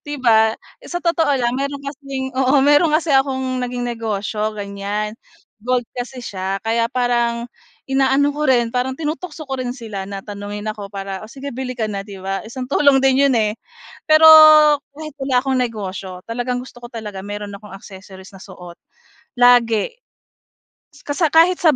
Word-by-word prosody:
'Di 290 0 -6
ba? 220 -4 +3 0.2
Sa 350 - -6
totoo 330 -2 +2
lang 240 -1 0
meron 280 +1 -4
kasing 275 -2 -6
oo, 265 +2 +3
meron 290 +3 +5
kasi 315 -3 -1
akong 260 -1 +1
naging 245 0 -3
negosyo, 215 -2 -3
ganyan. 205 +1 -4 0.5
Gold 250 +1 0
kasi 245 0 -7
siya 190 0 -3
kaya 230 +1 +1
parang, 240 -1 0 0.4
inaano 270 +1 +2
ko 300 -1 -2
rin, 240 -3 +2
parang 255 +1 -1
tinutukso 315 +1 -5
ko 270 -2 -4
rin 245 -1 -3
sila 205 -5 -7
na 195 -1 -6
tanungin 205 0 -7
ako 210 -2 -5
para, 195 -1 -6
"Oh, 215 - -10
sige 280 +2 -8
bili 255 0 -5
ka 225 - -1
na." 205 -2 -3
'Di 200 0 -10
ba? 195 +1 -4
Isang 255 +1 -6
tulong 280 +1 +3
din 270 +1 +4
'yon, 255 - +2
eh. 210 -1 +1 0.6
Pero 310 +1 +6 0.7
kahit 310 -1 -8
wala 270 -1 -2
akong 265 -1 0
negosyo, 195 -5 -5
talagang 245 +2 -2
gusto 245 -2 -14
ko 240 - -9
talaga 210 -4 -7
mayro'n 205 +1 -6
akong 210 -1 -14
accessories 190 -1 -13
na 190 - -14
suot. 180 -3 -12 0.6
Lagi. 245 - +3 1.1
Kasa 295 +3 0
kahit 330 +4 +4
sa 315 -5 +4
245 Hz, 170 wpm, -19 LUFS, 210-270 Hz, 1.1 s, Pero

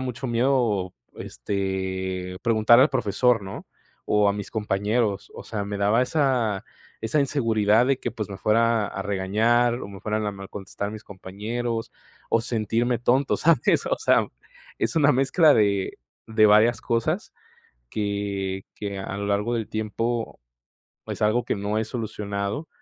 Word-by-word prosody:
mucho 130 0 -4
miedo, 120 -6 +1 0.2
este, 95 +3 -3
preguntar 115 0 +5
al 135 - +5
profesor, 120 -2 +2
¿no?, 95 0 -8 0.4
o 105 -1 +3
a 100 - +2
mis 105 -1 -6
compañeros. 105 0 -1
O - - -8
sea, 105 -3 -4
me 100 0 -4
daba 105 +4 +3
esa 125 -8 +1 0.4
esa 115 +7 +1
inseguridad 115 -5 +2
de 135 -1 +2
que, 120 - -3
pues, 105 -2 -5
me 95 - -7
fuera 115 0 +2
a 95 - -5
regañar 110 +5 +2
o - - -5
me 100 -1 -10
fueran 105 0 -2
a 105 - -2
mal 100 0 -9
contestar 100 +1 -5
mis 110 +1 -9
compañeros 115 +5 -4 0.4
o 115 - +3
sentirme 115 +1 0
tonto, 130 +3 +2
¿sabes? 160 -6 +3
O - - +1
sea, - - +3 0.5
es - - -1
una 145 -2 +5
mezcla 135 +5 +4
de 100 -2 +1 0.3
de 110 -1 +4
varias 110 +3 +5
cosas 115 -1 -1 0.6
que 100 -2 -3
que 100 -1 -5
a 95 0 -5
lo 100 0 -3
largo 105 +4 0
del 115 -2 -2
tiempo 115 +2 -3 0.7
es - - -5
algo 115 +3 +2
que - - -1
no 105 +1 -2
he 110 - -1
solucionado, 105 +2 -4
110 Hz, 155 wpm, -24 LUFS, 100-120 Hz, 0.7 s, preguntar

